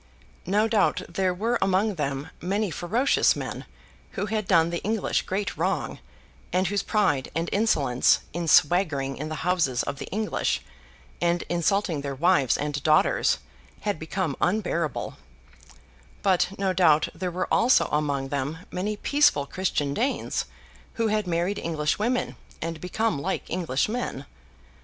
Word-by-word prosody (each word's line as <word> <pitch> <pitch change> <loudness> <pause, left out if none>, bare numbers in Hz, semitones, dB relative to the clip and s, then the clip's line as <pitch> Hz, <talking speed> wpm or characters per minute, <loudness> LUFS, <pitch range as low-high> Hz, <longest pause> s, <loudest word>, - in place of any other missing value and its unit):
No 210 +4 +3
doubt 205 -4 +2
there 185 +2 0
were 220 +7 -1
among 195 +3 +2
them 140 -4 -3
many 195 +2 -1
ferocious 220 - +2
men - - -5 0.5
who - - -2
had 215 -1 -2
done 170 -3 +4
the 170 - -3
English 215 0 0
great 195 +1 -2
wrong, - - -1 0.5
and 185 +1 +2
whose 200 +2 0
pride 205 -11 +1
and 165 +1 -1
insolence, 145 - +3
in 170 0 -3
swaggering 150 -5 +3
in 155 +2 -5
the 155 - -5
houses 170 -9 +1
of 140 - -5
the - - -6
English 205 - -1 0.6
and 175 0 +1
insulting 175 -1 +1
their 140 -1 -4
wives 155 -3 +3
and 145 0 -3
daughters, 155 - +3 0.4
had 205 -6 -2
become 160 -2 -2
unbearable; 175 - -1 1.1
but 185 -2 +3
no 195 -1 0
doubt 160 -4 +4
there 185 - -3
were 180 +1 -2
also 245 +2 +5
among 145 -2 0
them 145 +5 -3
many 205 +4 -2
peaceful 285 - +3
Christian 145 -4 -1
Danes 255 - -1 0.5
who 230 -2 +1
had 210 -2 0
married 175 +4 0
English 155 -1 -1
women 245 +4 0 0.2
and 165 -1 -4
become 180 -3 -1
like - - -2
English 165 -6 0
men. 215 - -4
180 Hz, 145 wpm, -26 LUFS, 150-205 Hz, 1.1 s, also